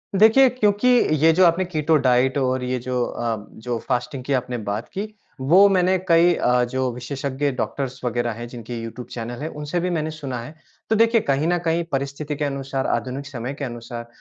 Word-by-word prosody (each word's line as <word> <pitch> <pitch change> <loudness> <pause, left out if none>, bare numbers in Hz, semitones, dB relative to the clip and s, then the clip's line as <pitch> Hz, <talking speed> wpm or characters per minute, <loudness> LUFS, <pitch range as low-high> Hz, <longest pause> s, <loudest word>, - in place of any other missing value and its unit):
देखिए, 225 +6 +6
क्योंकि 215 -1 +1 0.3
ये 160 +2 +5
जो 185 +3 +5
आपने 170 +2 +3
कीटो 160 -2 +1
डाइट 130 +1 +3
और 130 -1 0
ये 125 0 -1
जो 125 0 -1
अ, 115 -1 -2 0.2
जो 120 +2 -4
फास्टिंग 125 0 -2
की 140 - -1
आपने 125 -1 -1
बात 105 0 -4
की 210 +2 -5 0.3
वो 175 +10 +6
मैंने 185 -1 +3
कई 170 0 +5
अ, 125 0 +2
जो 130 +1 -1
विशेषज्ञ 135 +3 -3
डॉक्टर्स 130 0 -4
वगैरह 120 0 0
हैं, 120 +2 -7
जिनके 120 0 -8
यूट्यूब 115 +2 -7
चैनल 120 +2 -6
हैं, 155 - -3
उनसे 150 +3 -3
भी 180 +1 -1
मैंने 155 -2 -1
सुना 135 -5 -5
है। 135 +7 -10 0.3
तो 220 - +3
देखिए 230 +1 +4
कहीं 140 0 0
न 175 +1 +2
कहीं 165 +1 +1
परिस्थिति 140 +2 -3
के 150 - -2
अनुसार, 135 -1 -3
आधुनिक 135 +2 -2
समय 130 -1 -5
के 140 0 -5
अनुसार 120 -1 -7
135 Hz, 200 wpm, -22 LUFS, 125-165 Hz, 0.3 s, देखिए